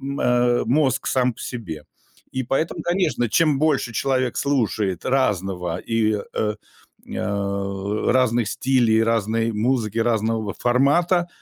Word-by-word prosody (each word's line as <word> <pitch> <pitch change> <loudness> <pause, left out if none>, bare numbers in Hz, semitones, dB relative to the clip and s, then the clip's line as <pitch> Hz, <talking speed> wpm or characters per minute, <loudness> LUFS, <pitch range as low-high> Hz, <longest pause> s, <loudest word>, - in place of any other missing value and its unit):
м, 140 +1 -4
э, 120 0 +2
мозг 135 +2 +1
сам 125 -1 +1
по - - -14
себе. 85 - -6 0.5
И 130 - -2
поэтому, 135 +6 -2
конечно, 175 -9 0
чем 150 +4 +2
больше 150 -6 +1
человек 130 0 0
слушает 110 - 0
разного, 95 -9 0
и, 110 +1 0 0.2
э, 105 -1 0 0.6
а, 100 +1 -2
разных 120 -3 +2
стили, 120 -2 +2
разной 115 0 +1
музыки, 115 0 0
разного 110 -2 0
формата, 165 +8 +2
120 Hz, 120 wpm, -22 LUFS, 105-135 Hz, 0.6 s, э